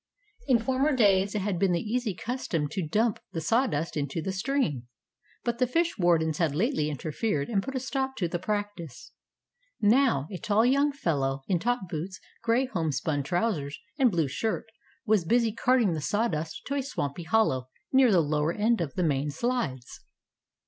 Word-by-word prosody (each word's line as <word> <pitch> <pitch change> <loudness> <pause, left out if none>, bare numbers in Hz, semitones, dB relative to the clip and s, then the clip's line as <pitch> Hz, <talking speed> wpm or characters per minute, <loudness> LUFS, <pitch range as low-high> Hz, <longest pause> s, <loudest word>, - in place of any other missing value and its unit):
In 250 - +5
former 260 +5 +1
days 200 -3 +3
it 205 - 0
had 195 -4 -1
been 190 -1 +3
the 170 - +1
easy 220 0 -2
custom 185 - -2
to 190 - -3
dump 220 +6 +1
the 165 - -2
sawdust 165 - 0
into 145 +1 -2
the 190 +4 -2
stream, 190 - -1 0.6
but 235 -1 -2
the 255 - +3
fish 335 +6 +1
wardens 160 -3 +2
had 160 -5 +1
lately 185 - +1
interfered 150 +2 -2
and 205 -4 +1
put 270 +5 -6
a - - +1
stop 265 0 -2
to 180 -8 -1
the 175 +1 -3
practice. 205 - -4 0.7
Now, 225 - +3
a 185 - -5
tall 210 +5 +2
young 280 +3 +3
fellow, 140 - -1
in 180 -3 +1
top 240 -1 -1
boots, 175 +4 -5 0.2
gray 235 +3 +2
homespun 160 - -1
trousers 155 -2 -1 0.2
and 260 -2 +5
blue 165 -7 +1
shirt, 220 - -2 0.4
was 215 -5 +3
busy 230 +5 +2
carting 235 -3 +2
the 155 - -3
sawdust 165 -4 -1
to 280 - -3
a 280 - 0
swampy 160 - -4
hollow 160 -8 +1 0.2
near 260 -3 +6
the 180 -4 +5
lower 150 +1 0
end 220 0 +1
of 145 -6 -4
the 180 - 0
main 145 -2 +1
slides. 150 - -3
195 Hz, 175 wpm, -28 LUFS, 155-240 Hz, 0.7 s, near